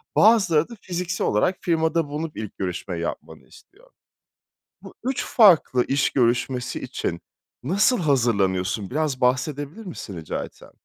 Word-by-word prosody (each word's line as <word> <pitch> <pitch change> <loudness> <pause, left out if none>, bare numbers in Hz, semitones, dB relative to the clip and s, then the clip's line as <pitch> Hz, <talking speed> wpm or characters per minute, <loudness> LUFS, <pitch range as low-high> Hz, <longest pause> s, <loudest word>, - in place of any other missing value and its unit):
Bazıları 195 -8 +4
da - - -9
fiziksel 180 0 -2
olarak 140 - +1
firmada 160 -2 +1
bulunup 150 +2 -5
ilk 110 -2 -7
görüşmeyi 90 -2 -4
yapmanı 85 - -6
istiyor. 485 +6 -20 0.9
Bu - - -12
3 260 +1 -1
farklı 170 - +5
iş 135 0 +2
görüşmesi 125 0 0
için 85 - -4 0.4
nasıl 200 - +2
hazırlanıyorsun 100 - +1
biraz 145 -2 -1
bahsedebilir 145 - -1
misin 110 - -7
rica 80 -2 -4
etsem? - - -14
145 Hz, 125 wpm, -23 LUFS, 115-180 Hz, 0.9 s, farklı